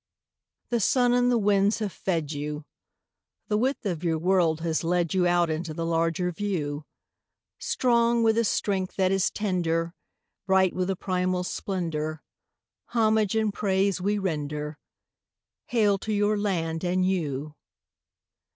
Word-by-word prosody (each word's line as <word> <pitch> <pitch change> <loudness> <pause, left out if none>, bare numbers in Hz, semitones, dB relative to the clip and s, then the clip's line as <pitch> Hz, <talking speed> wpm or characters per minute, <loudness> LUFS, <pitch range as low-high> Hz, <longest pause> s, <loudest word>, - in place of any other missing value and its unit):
The 240 - +1
sun 245 +3 +3
and 245 0 +3
the 240 - +3
winds 205 0 +3
have 215 -3 -3
fed 165 -6 -2
you; 150 0 -5 0.8
The 210 - +2
width 260 +1 -1
of 175 -4 -2
your 165 -2 +1
world 170 -2 +2
has 165 -1 -1
led 175 0 0
you 180 -2 +3
Out 175 -1 +2
into 155 0 -4
the 165 - -2
larger 165 +2 0
view; 160 -6 -3 0.7
Strong 235 -1 +2
with 225 -1 +4
a - - +3
strength 195 -3 -1
that 190 -1 +2
is 195 0 +2
tender, 170 -4 -1 0.5
Bright 190 -1 +3
with 185 0 -1
a 195 - 0
primal 185 -1 -1
splendour, 160 -5 -3 0.6
Homage 220 -3 +2
and 220 -2 +1
praise 195 -1 0
we 205 +3 +1
render— 150 -5 -3 0.9
Hail 210 -4 +2
to 215 - -4
your 205 0 +2
land 170 -6 -1
and 185 +1 +1
you! 150 -6 -2
185 Hz, 140 wpm, -26 LUFS, 165-205 Hz, 0.9 s, with